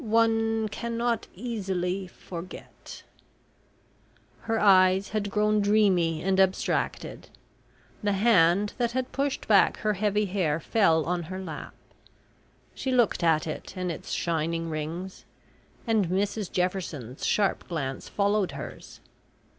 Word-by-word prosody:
one 225 Hz, -1 st, +2 dB
cannot 235 Hz, +2 st, -2 dB
easily 190 Hz, -5 st, -3 dB
forget..." 175 Hz, 0 st, -10 dB, 1.4 s
Her 225 Hz, -1 st, -1 dB
eyes 190 Hz, -1 st, +5 dB
had 210 Hz, -1 st, -2 dB
grown 210 Hz, +1 st, +2 dB
dreamy 190 Hz, -6 st, +2 dB
and 190 Hz, 0 st, +1 dB
abstracted. 190 Hz, -1 st, 0 dB, 0.7 s
The 205 Hz, -1 st, +1 dB
hand 195 Hz, -2 st, +3 dB
that 240 Hz, -1 st, 0 dB
had 255 Hz, 0 st, -2 dB
pushed 275 Hz, 0 st, -2 dB
back 205 Hz, -3 st, +5 dB
her 215 Hz, -1 st, +1 dB
heavy 210 Hz, +1 st, +1 dB
hair 180 Hz, -6 st, 0 dB
fell 165 Hz, -4 st, +2 dB
on 175 Hz, 0 st, -1 dB
her 185 Hz, 0 st, -5 dB
lap. 165 Hz, -6 st, -7 dB, 1.0 s
She 265 Hz, -, -3 dB
looked 240 Hz, -8 st, +2 dB
at 160 Hz, -2 st, +3 dB
it 160 Hz, +4 st, -6 dB
and 180 Hz, -1 st, -2 dB
its 160 Hz, -, -8 dB
shining 165 Hz, 0 st, -1 dB
rings, 165 Hz, +5 st, -5 dB, 0.6 s
and 220 Hz, -5 st, +2 dB
Mrs 200 Hz, +2 st, -1 dB
Jefferson's 170 Hz, -, -3 dB
sharp 205 Hz, -2 st, +1 dB
glance 135 Hz, -6 st, -4 dB
followed 200 Hz, -1 st, +1 dB
hers. -, -, -9 dB
195 Hz, 120 wpm, -27 LUFS, 175-215 Hz, 1.4 s, eyes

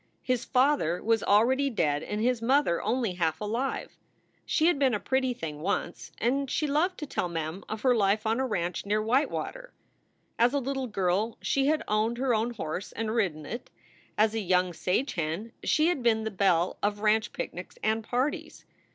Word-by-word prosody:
His 250 Hz, -2 st, 0 dB
father 255 Hz, -, +2 dB
was 225 Hz, 0 st, +2 dB
already 255 Hz, +7 st, +3 dB
dead 150 Hz, -, 0 dB
and 210 Hz, +5 st, -4 dB
his 240 Hz, +1 st, +1 dB
mother 245 Hz, -, +2 dB
only 230 Hz, -1 st, 0 dB
half 165 Hz, -3 st, -1 dB
alive. 230 Hz, +6 st, -3 dB, 0.5 s
She 315 Hz, -, +2 dB
had 340 Hz, -4 st, +3 dB
been 265 Hz, -5 st, +3 dB
a -, -, -2 dB
pretty 260 Hz, +2 st, 0 dB
thing 155 Hz, -7 st, -6 dB
once, 190 Hz, +5 st, -3 dB
and 270 Hz, +4 st, 0 dB
she 305 Hz, -, 0 dB
loved 315 Hz, +6 st, +1 dB
to 300 Hz, -, -5 dB
tell 180 Hz, -10 st, -2 dB
Mem 165 Hz, +2 st, -4 dB
of 215 Hz, 0 st, -4 dB
her 255 Hz, -2 st, +5 dB
life 210 Hz, 0 st, +2 dB
on 225 Hz, +3 st, +1 dB
a 265 Hz, -, +1 dB
ranch 175 Hz, -6 st, -2 dB
near 210 Hz, +1 st, +1 dB
Whitewater. 285 Hz, -, -1 dB, 0.7 s
As 240 Hz, +4 st, +4 dB
a -, -, +3 dB
little 270 Hz, 0 st, -2 dB
girl 200 Hz, +1 st, 0 dB
she 275 Hz, 0 st, +1 dB
had 310 Hz, +1 st, +2 dB
owned 220 Hz, +3 st, +1 dB
her 255 Hz, -1 st, +1 dB
own 230 Hz, +2 st, 0 dB
horse 175 Hz, -1 st, -4 dB
and 220 Hz, 0 st, -2 dB
ridden 175 Hz, -10 st, 0 dB
it. 235 Hz, -, -6 dB, 0.5 s
As 215 Hz, 0 st, +3 dB
a 225 Hz, -, -1 dB
young 180 Hz, -2 st, +1 dB
"sage 185 Hz, -, -1 dB
hen" 165 Hz, +7 st, -3 dB
she 310 Hz, +2 st, +3 dB
had 350 Hz, -7 st, -1 dB
been 225 Hz, -2 st, +2 dB
the 220 Hz, -, -3 dB
belle 185 Hz, -3 st, +2 dB
of 205 Hz, 0 st, -1 dB
ranch 215 Hz, +1 st, +2 dB
picnics -, -, -6 dB
and 220 Hz, +1 st, +1 dB
parties. 255 Hz, +6 st, -2 dB
225 Hz, 190 wpm, -28 LUFS, 195-260 Hz, 0.7 s, her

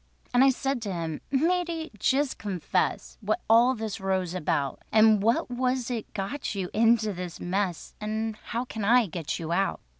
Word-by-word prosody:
And 245 Hz, +1 st, +6 dB
I 270 Hz, -, +7 dB
said 270 Hz, -1 st, -1 dB
to 205 Hz, -3 st, -3 dB
him, 165 Hz, -3 st, -4 dB
"Matey, 330 Hz, +3 st, 0 dB
just 275 Hz, +4 st, +1 dB
confess 160 Hz, -, -2 dB
What -, -, -1 dB
all 230 Hz, +3 st, +6 dB
of 260 Hz, -, 0 dB
this 215 Hz, -2 st, -4 dB
row's 190 Hz, -2 st, -1 dB
about, 155 Hz, -6 st, -1 dB
And 215 Hz, -1 st, +5 dB
what 230 Hz, +3 st, +1 dB
was 250 Hz, 0 st, -1 dB
it 230 Hz, -3 st, -4 dB
got 205 Hz, +4 st, -3 dB
you 185 Hz, -2 st, -3 dB
into 225 Hz, -1 st, +3 dB
this 180 Hz, -1 st, -6 dB
mess, 185 Hz, -1 st, -2 dB
And 220 Hz, +1 st, -2 dB
how 235 Hz, +3 st, -4 dB
can 220 Hz, -4 st, -5 dB
I 235 Hz, +3 st, +5 dB
get 165 Hz, -4 st, -4 dB
you 165 Hz, 0 st, -5 dB
out?" 195 Hz, +3 st, +1 dB
215 Hz, 180 wpm, -27 LUFS, 185-250 Hz, -, I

